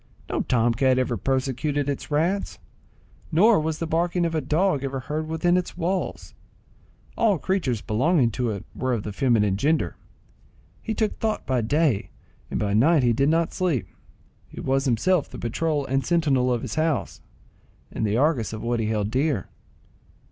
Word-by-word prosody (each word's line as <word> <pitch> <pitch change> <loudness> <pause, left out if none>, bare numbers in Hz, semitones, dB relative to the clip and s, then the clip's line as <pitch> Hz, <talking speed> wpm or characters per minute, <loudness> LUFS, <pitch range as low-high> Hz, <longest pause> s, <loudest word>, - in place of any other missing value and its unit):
No - - 0
tom 120 -1 +2
cat 130 +2 +2
ever 130 -2 0
persecuted 135 +4 -1
its 140 -2 -3
rats, 170 +7 0 0.7
nor 205 +7 +5
was 155 0 -2
the 165 - -3
barking 170 +2 0
of 165 - -1
a 160 - 0
dog 150 +1 +1
ever 135 -1 -3
heard 155 +5 -3
within 175 +3 +1
its 180 -1 -3
walls; 180 +2 -3 0.8
all 215 -5 +3
creatures 150 - -1
belonging 125 +4 +2
to 125 +2 -1
it 100 -3 -5
were 130 -1 -1
of 110 -4 -2
the 105 - -5
feminine 105 -5 +2
gender. 155 +8 +1 0.9
He 220 - -3
took 215 -1 -1
thought 220 -1 -1
by 130 -2 +1
day, 140 -1 +1 0.4
and - - -2
by 100 -1 0
night 140 +7 +4
he 120 -1 +3
did 140 +5 +2
not 165 +1 +1
sleep; 165 - 0 0.6
he - - -11
was 135 +1 0
himself 145 +7 +1
the - - -9
patrol 145 +4 -1
and 135 +1 0
sentinel 140 -7 +2
of 120 -2 -1
his 125 - -4
house, 160 -1 -1 0.7
and - - -3
the 105 +1 +1
Argus 135 -5 +1
of 110 - -6
what 120 0 0
he 110 - -1
held 105 -1 -1
dear. 135 - 0
140 Hz, 175 wpm, -24 LUFS, 120-165 Hz, 0.9 s, nor